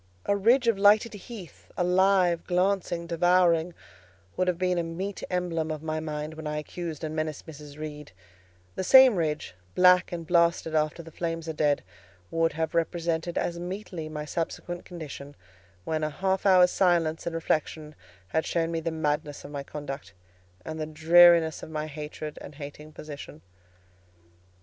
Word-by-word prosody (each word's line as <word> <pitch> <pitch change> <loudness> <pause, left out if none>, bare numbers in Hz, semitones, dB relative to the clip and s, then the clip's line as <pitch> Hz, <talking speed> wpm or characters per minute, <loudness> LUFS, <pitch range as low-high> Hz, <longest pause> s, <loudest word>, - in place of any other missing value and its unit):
A 200 - +2
ridge 235 +5 +3
of 225 -4 +2
lighted 210 +3 +5
heath, 205 -3 -11
alive, 180 -1 +3
glancing, 180 -2 0
devouring, 170 0 +2 0.6
would 185 - 0
have 180 -2 +1
been 180 -1 +1
a - - 0
meet 185 +4 -5
emblem 175 -3 -1
of 155 -1 -4
my 155 0 -2
mind 155 0 -4
when 160 -1 -7
I 150 0 -2
accused 160 0 -6
and 155 0 -3
menaced 155 -2 -3
Mrs. 150 -2 -11
Reed: 150 -3 -7 0.6
the - - -3
same 260 +3 +8
ridge, 155 - -2 0.2
black 180 0 +5
and 170 -1 -5
blasted 170 -1 +2
after 155 +2 0
the 165 - -12
flames 165 0 -4
are 160 - -3
dead, 150 -1 +1 0.5
would 165 0 +1
have 160 0 -2
represented 170 0 -1
as 170 0 -1
meetly 180 -3 -6
my 150 -1 -5
subsequent 175 +2 -4
condition, 145 -4 -9 0.5
when 155 - -2
half 190 +6 -1
an 195 - +6
hour's 180 -1 +6
silence 170 -4 +1
and 165 - -3
reflection 155 -1 -2 0.4
had 160 +9 0
shown 165 -1 -1
me 165 - -1
the 165 +1 -2
madness 150 -2 -2
of 145 - -9
my 140 -1 -4
conduct, 140 - -7 0.5
and 160 0 -5
the 155 - -3
dreariness 165 +1 +5
of - - -9
my 155 -1 -3
hated 150 0 -7
and 145 - -10
hating 150 +1 -9
position. 145 - -10
165 Hz, 165 wpm, -27 LUFS, 155-180 Hz, 0.6 s, same